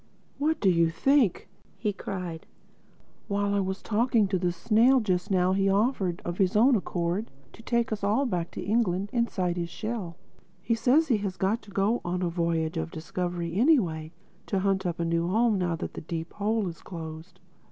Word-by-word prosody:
"What 310 +2 +1
do 200 - +1
you 170 -1 +3
think?" 245 - +2 0.3
he 210 -2 -1
cried, 180 -4 -6 0.8
"while 200 0 0
I 200 - +2
was 190 0 -3
talking 230 -1 +2
to 190 -2 0
the 175 -1 +1
snail 235 +8 +4
just 185 -6 -1
now 185 -1 +2
he 195 0 +2
offered, 195 -4 +1
of 175 +2 -4
his 190 0 +2
own 245 +5 +5
accord, 180 +1 -2 0.2
to - - -13
take 235 0 0
us 210 -2 -3
all 215 +8 +2
back 175 -8 -2
to - - -5
England 200 -3 0
inside 190 -7 0
his 170 -1 -2
shell. 210 -3 -5 0.4
He 210 +6 -1
says 270 +7 +3
he 235 - +4
has 195 -3 -4
got 195 +5 0
to 205 - -16
go 200 +4 +1
on 180 +1 -2
a 175 - +1
voyage 165 -1 -1
of 160 0 -2
discovery 170 +1 -4
anyway, 185 - +2 0.4
to 195 -2 0
hunt 190 -1 +1
up 170 -1 -3
a 170 - 0
new 170 0 0
home, 220 +2 +2
now 175 -2 0
that - - -5
the - - -6
Deep 165 +1 -5
Hole 210 0 0
is 170 -1 -7
closed. 165 +1 -9
190 Hz, 195 wpm, -27 LUFS, 175-220 Hz, 0.8 s, own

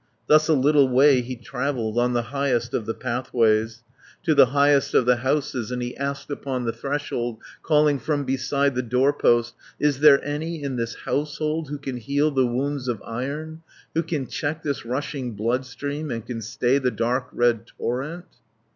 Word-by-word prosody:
Thus 155 0 +5
a 160 - +4
little 140 0 +4
way 130 +1 +5
he 125 +1 -6
travelled, 120 -2 -2
On 125 +1 +2
the 120 -1 +1
highest 125 -4 0
of 110 - -2
the 115 - -1
pathways, 115 -3 0 0.4
To 165 -3 +3
the 135 - +7
highest 140 +1 +3
of 125 - +5
the 125 0 +4
houses, 130 -2 -1
And 125 0 -3
he 120 0 -5
asked 140 +1 -4
upon 130 -3 -3
the 115 - -1
threshold, 120 -2 -3 0.2
Calling 150 -2 +3
from 145 -1 -1
beside 135 +2 0
the 125 - 0
doorpost, 125 -1 +2 0.3
"Is 145 -2 +1
there 145 -2 +7
any 155 +2 -3
in 135 -2 -3
this 115 -1 -3
household, 150 +3 -2
Who 145 - -4
can 135 -3 -5
heal 140 +6 0
the 130 -3 +2
wounds 135 +2 -2
of 120 -4 -1
iron, 145 +7 -5 0.3
Who 165 - +2
can 160 -4 -3
check 150 +4 -3
this 140 -5 -3
rushing 130 -1 -3
bloodstream, 130 +7 -3
And 115 -3 -4
can 115 -1 -5
stay 120 +5 +1
the 130 -2 +1
dark 125 +2 -1
red 120 -1 +1
torrent?" 145 +11 -4
130 Hz, 175 wpm, -24 LUFS, 120-145 Hz, 0.4 s, the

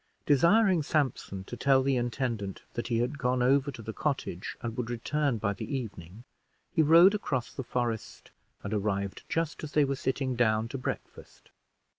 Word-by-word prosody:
Desiring 175 - +4
Sampson 135 -10 -1
to 120 - -7
tell 135 +2 +3
the 135 0 +2
intendant 120 -5 -2
that 120 - -3
he 120 -2 0
had 125 +5 -1
gone 125 -1 +1
over 135 +2 +3
to 120 -5 -8
the 110 +1 -5
cottage 130 - -3
and 115 -1 -3
would 120 -1 -3
return 135 +2 0
by 100 -1 -1
the 135 +7 -4
evening, 100 -3 -8 0.5
he 170 - +4
rode 165 +6 +7
across 130 - -2
the - - -4
forest, 120 -3 -3 0.3
and 100 - -4
arrived 100 -1 -1
just 165 -2 -2
as 155 - -6
they 150 -1 +4
were 140 0 -1
sitting 130 -1 -1
down 110 -2 +2
to 135 - -5
breakfast. - - -7
125 Hz, 175 wpm, -29 LUFS, 115-145 Hz, 0.5 s, rode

